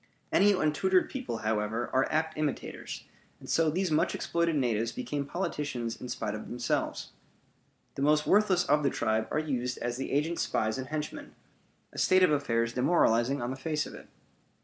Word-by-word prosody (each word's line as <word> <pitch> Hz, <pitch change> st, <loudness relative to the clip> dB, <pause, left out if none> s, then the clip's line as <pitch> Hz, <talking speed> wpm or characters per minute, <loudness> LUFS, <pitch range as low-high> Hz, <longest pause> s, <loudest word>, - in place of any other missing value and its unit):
Any 205 Hz, +1 st, +5 dB
untutored 185 Hz, +2 st, +2 dB
people, 255 Hz, -, -4 dB
however, 110 Hz, +2 st, -1 dB
are 130 Hz, +1 st, +2 dB
apt 160 Hz, 0 st, 0 dB
imitators, 150 Hz, -2 st, -4 dB, 0.4 s
and -, -, -12 dB
so 165 Hz, -1 st, +3 dB
these 180 Hz, +2 st, 0 dB
much 155 Hz, +2 st, +2 dB
exploited 170 Hz, -1 st, 0 dB
natives 115 Hz, -4 st, +1 dB
become 140 Hz, +3 st, -4 dB
politicians 140 Hz, -9 st, -3 dB
in 125 Hz, -, -6 dB
spite 105 Hz, -3 st, -3 dB
of 110 Hz, -, -6 dB
themselves. 120 Hz, 0 st, -2 dB, 0.8 s
The -, -, -6 dB
most 150 Hz, +1 st, +3 dB
worthless 195 Hz, -3 st, +4 dB
of 150 Hz, +1 st, +3 dB
the 145 Hz, -, +2 dB
tribe 110 Hz, 0 st, 0 dB
are -, -, -1 dB
used 125 Hz, -5 st, -1 dB
as 120 Hz, 0 st, -3 dB
the 135 Hz, -, -4 dB
agent's 155 Hz, +4 st, 0 dB
spies 110 Hz, +4 st, 0 dB
and 130 Hz, -, -5 dB
henchmen; 155 Hz, +1 st, -5 dB, 0.6 s
a -, -, -6 dB
state 185 Hz, 0 st, +5 dB
of 180 Hz, -, +5 dB
affairs 115 Hz, -5 st, +1 dB
demoralizing 125 Hz, -2 st, +2 dB
on 120 Hz, -, -2 dB
the -, -, -3 dB
face 150 Hz, +3 st, -2 dB
of -, -, -9 dB
it. -, -, -11 dB
145 Hz, 175 wpm, -29 LUFS, 120-160 Hz, 0.8 s, Any